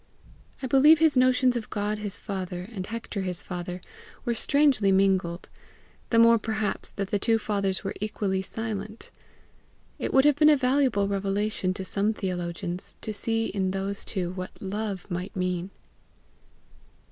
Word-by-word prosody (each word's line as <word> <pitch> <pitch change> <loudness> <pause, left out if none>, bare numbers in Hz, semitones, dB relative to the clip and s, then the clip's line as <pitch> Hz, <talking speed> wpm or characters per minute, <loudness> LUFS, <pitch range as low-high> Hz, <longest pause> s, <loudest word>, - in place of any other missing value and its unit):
I - - 0
believe 275 +5 +6
his 315 -2 +4
notions 255 0 +4
of 235 -3 -4
God 210 0 -2
his 205 -2 -2
father, 185 -3 -5
and 190 -4 -5
Hector 225 -2 -4
his 180 -2 -3
father, 180 0 -5 0.4
were 235 - +1
strangely 265 -5 +3
mingled 190 -3 +1 0.6
the 230 - +2
more 230 0 +7
perhaps 215 -2 -2
that 195 -1 -4
the 205 - +1
two 225 +2 +3
fathers 200 -3 -1
were 195 - -3
equally 205 -3 -1
silent. 215 +1 -6 0.9
It - - -2
would 265 +1 +5
have 295 -2 +5
been 305 0 +6
a 300 - +6
valuable 255 -6 +2
revelation 200 0 -1
to 190 - -5
some 210 +3 0
theologians 175 -1 -4
to 215 - -4
see 225 +2 -1
in 190 -2 -1
those 195 +1 -2
two 180 -4 -2
what 185 0 -7
love 200 -1 -4
might 180 +4 -4
mean. 180 0 -2
200 Hz, 155 wpm, -26 LUFS, 190-230 Hz, 0.9 s, more